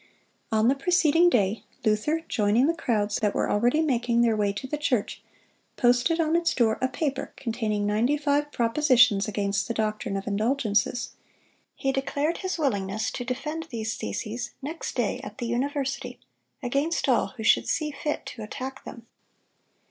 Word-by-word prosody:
On 220 0 +3
the 260 - +5
preceding 335 +2 +4
day, 210 - +1 0.2
Luther, 220 +10 +1
joining 215 +3 +2
the 330 - +2
crowds 215 -10 0
that 210 -2 0
were - - 0
already 245 +9 +2
making 240 -5 +1
their 230 -2 +3
way 205 -1 +1
to 205 +6 -6
the 265 - -3
church, 250 -8 -1 0.6
posted 245 +7 +3
on 320 0 +2
its 340 0 +1
door 225 -3 +2
a 260 - +3
paper 270 +2 -3
containing 220 -4 -2
ninety 225 +8 +2
five 290 0 0
propositions 240 -4 +4
against 200 -1 -1
the 230 - -3
doctrine 215 -1 -1
of 195 - -5
indulgences. 220 +1 0 0.6
He 270 - 0
declared 285 +4 -1
his 375 -1 -3
willingness 215 - -1
to - - -4
defend 300 +6 -4
these 225 -2 -3
theses 230 +3 -4
next 310 +5 -5
day - - 0
at - - -9
the 245 - -4
university, 270 +3 -2 0.4
against 280 +7 0
all 255 -1 +2
who 220 - -5
should 225 - +4
see 305 -2 0
fit 295 +1 -3
to 230 - -8
attack 260 +5 -6
them. 235 -2 -10
245 Hz, 165 wpm, -26 LUFS, 215-290 Hz, 0.6 s, the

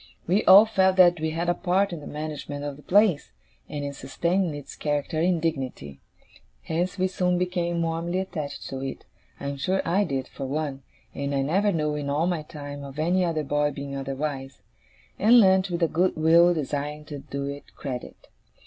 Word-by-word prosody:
We 190 +5 +2
all 195 +3 +9
felt 190 -4 +2
that 175 -2 +6
we 160 0 -1
had 165 +2 -2
a 175 - +3
part 185 +2 +1
in 170 - -5
the 145 - -10
management 150 -1 -5
of 145 -1 -4
the 145 - -15
place, 195 -3 +2 0.4
and 145 -1 -4
in 140 - -4
sustaining 170 +5 -1
its 145 -1 -9
character 150 +2 -2
and 175 +1 +2
dignity. 130 - -4 0.6
Hence, 175 +4 -2
we 185 0 +2
soon 180 -1 0
became 175 -1 -1
warmly 165 +2 -2
attached 155 -7 -4
to 135 - -5
it 135 -1 -6 0.3
I - - -7
am 140 - -5
sure 185 +7 0
I 195 +5 +2
did 135 -5 -3
for 135 - -6
one, 140 -1 -3 0.3
and 140 0 -3
I 135 - +1
never 195 +9 +2
knew, 150 -4 0
in 145 -1 -3
all 150 +4 +1
my 175 -3 0
time, 145 -2 -8
of 140 0 -9
any 175 +4 +2
other 165 -3 0
boy 145 +1 +1
being 140 -1 -6
otherwise 135 0 -4 0.6
and 230 +4 +7
learnt 190 -2 +4
with 170 -1 -1
a - - +5
good 180 +4 +1
will, 165 +2 +5
desiring 150 -1 -3
to 145 -1 -7
do 140 0 -5
it 140 0 -8
credit. 130 -4 -7
155 Hz, 195 wpm, -25 LUFS, 140-180 Hz, 0.6 s, all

